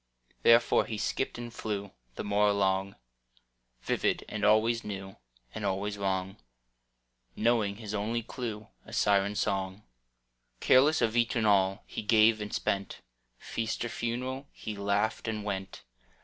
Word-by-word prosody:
Therefore 115 +1 +5
he 110 - -4
skipped 110 +5 -2
and 120 -1 -7
flew 100 -3 -4 0.2
The - - -4
more 105 +1 +2
along, 95 -1 +1 0.9
Vivid - - 0
and 105 -1 -5
always 110 +2 +3
new 95 -2 -7 0.4
And 110 - -5
always 100 +1 -1
wrong, 95 -1 -2 1.0
Knowing 110 -3 +2
his 105 -1 -7
only 110 +3 -1
clew 110 -3 -6
A - - -13
siren 100 0 +2
song. 95 0 -1 0.8
Careless 140 +2 +5
of 115 0 +1
each 120 0 +2
and 115 -2 +1
all 95 -1 +3
He - - -5
gave 110 0 +4
and 105 - -5
spent: 100 0 -2 0.4
Feast 110 - -3
or - - -3
a - - -8
funeral 130 +4 -3
He 110 - -6
laughed 100 +3 0
and 110 -2 -2
went. 95 -2 -5
105 Hz, 145 wpm, -30 LUFS, 100-115 Hz, 1.0 s, Therefore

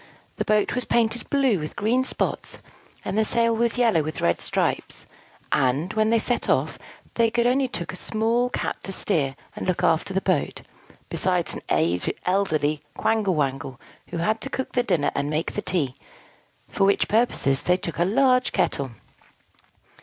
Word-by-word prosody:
The - - -1
boat 210 -1 +2
was 250 - 0
painted 235 0 +1
blue 270 -8 +2
with 155 0 -6
green 235 +5 +1
spots, - - -3 0.5
and - - -2
the 220 - +3
sail 230 +1 +2
was 235 +1 +1
yellow 230 -9 +3
with 155 0 -5
red 85 - +1
stripes: - - -2 0.5
and, 140 +9 +1
when 215 0 +2
they 230 - +4
set 240 +2 0
off, - - +1 0.3
they 230 -1 +2
only 260 +2 +3
took 170 -8 -6
a - - -6
small 225 +5 0
Cat - - -3
to 195 - -4
steer 150 -9 0 0.2
and - - -5
look 180 -1 0
after 165 +2 +2
the 190 - +1
boat, 185 -6 -1 0.5
besides - - 0
an - - -6 0.6
elderly 155 -6 +1 0.2
Quangle 215 -5 +1
Wangle, 135 -2 -2 0.3
who 175 - -5
had 215 +6 0
to 270 - -4
cook 265 -1 -4
the 245 - +2
dinner 170 -11 +1
and 140 +1 -1
make 155 +2 -1
the - - -3
tea; 145 -9 0 0.7
for 195 - -1
which 200 - +2
purposes 210 - +2
they 180 0 +2
took 170 -2 -6
a - - +4
large 255 +6 +3
kettle. 140 -1 0
195 Hz, 170 wpm, -24 LUFS, 155-230 Hz, 0.7 s, they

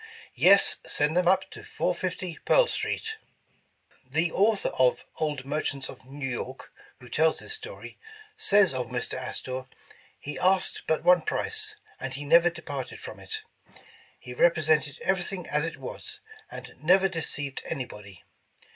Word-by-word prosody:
"Yes, 195 +2 +5
send 150 +2 +1
them 180 0 +3
up 190 +1 +3
to 425 - -8
450 185 - -2
Pearl - - +5
Street." 445 -1 -2 0.9
The 160 +6 0
author 210 +1 +2
of 130 -1 +2
''Old 150 -4 -2
Merchants 140 -1 -1
of - - -12
New 135 +1 -5
York," 130 +1 -6 0.3
who 125 - -13
tells 160 +4 +2
this - - -6
story," 435 +3 -9 0.4
says 205 - +5
Mr. 130 -1 -3
Astor: 130 0 -4 0.5
"He 145 - -6
asked 185 +1 +2
but 160 - +1
one 180 -1 +6
price, 430 - +1 0.2
and 135 -1 -5
he 145 +1 -6
never 170 +3 +6
departed 145 -6 -6
from - - -9
it. - - -6 0.8
He 125 - -9
represented 155 -1 +2
everything 190 -1 -1
as 150 +2 0
it - - -6
was, - - -6 0.3
and - - -9
never 185 +5 +4
deceived 150 -6 -3
anybody. 105 - -7
160 Hz, 140 wpm, -27 LUFS, 135-190 Hz, 0.9 s, one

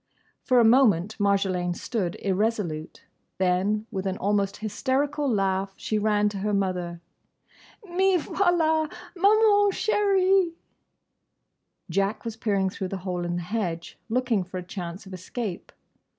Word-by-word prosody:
For 255 -2 +3
a - - +6
moment 220 -5 +4
Marjolaine 190 -3 +1
stood 185 -6 -3
irresolute. 195 -5 -1 0.3
Then, 190 +4 +1
with 190 0 -3
an 190 0 -2
almost 200 0 0
hysterical 275 +7 -1
laugh, 195 -2 0
she 215 - -1
ran 210 0 +2
to 205 -1 -6
her 210 +1 0
mother. 180 -3 -2 0.9
"Me 375 +1 +2
voilà, 320 -2 +1 0.2
Maman 410 +2 +5
chèrie!" 390 -4 +2 1.3
Jack 195 +6 -1
was 230 -1 -4
peering 200 -4 0
through 190 - -4
the 195 - -4
hole 180 -2 -2
in 175 0 -2
the 175 - -3
hedge, 175 -4 -4
looking 235 -4 +1
for 185 +1 -8
a 180 - -5
chance 180 0 -7
of 190 - -10
escape. 185 +1 -5
205 Hz, 135 wpm, -26 LUFS, 185-260 Hz, 1.3 s, a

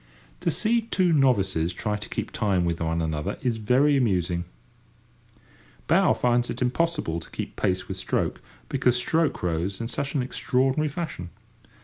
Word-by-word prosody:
To - - 0
see 230 +2 +2
two 185 -6 +1
novices 95 - +2
try 105 +3 -2
to 105 0 -7
keep - - -4
time 95 -5 +1
with 85 -1 -1
one 80 0 0
another 75 -2 -2
is 120 -3 0
very 130 +7 +3
amusing. 90 -8 +1 1.4
Bow - - +4
finds 120 0 +1
it 120 - -4
impossible 130 - 0
to 80 - -12
keep - - -6
pace 95 0 0
with - - -5
stroke, - - -1 0.3
because 125 -2 +2
stroke 155 - 0
rows 90 +3 -1
in 115 - -3
such 140 +4 -3
an 135 - +2
extraordinary 130 +3 +1
fashion. 145 - -5
120 Hz, 155 wpm, -26 LUFS, 90-140 Hz, 1.4 s, Bow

